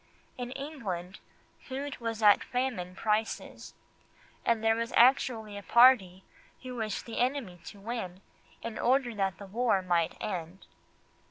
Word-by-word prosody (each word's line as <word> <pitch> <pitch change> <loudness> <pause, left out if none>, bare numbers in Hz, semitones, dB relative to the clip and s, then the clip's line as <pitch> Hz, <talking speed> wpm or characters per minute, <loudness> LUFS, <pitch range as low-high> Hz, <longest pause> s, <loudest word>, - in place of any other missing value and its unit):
In 245 -1 -5
England 215 - -5 0.4
food 275 +2 -6
was 225 -2 -3
at 205 -1 +6
famine 245 -8 -2
prices, 215 +2 -2 0.7
and 230 -1 +1
there 225 0 +4
was 230 +1 -3
actually 230 -4 +3
a - - -10
party 200 -6 +5 0.4
who 250 -1 -6
wished 220 -2 -3
the 230 - -5
enemy 245 -8 -1
to 205 - -10
win 195 -4 -5 0.4
in 230 -1 -5
order 255 -1 +2
that 195 -4 -1
the 200 - -9
war 210 -1 +1
might 170 -2 +1
end. 180 -2 -5
225 Hz, 140 wpm, -30 LUFS, 190-245 Hz, 0.7 s, at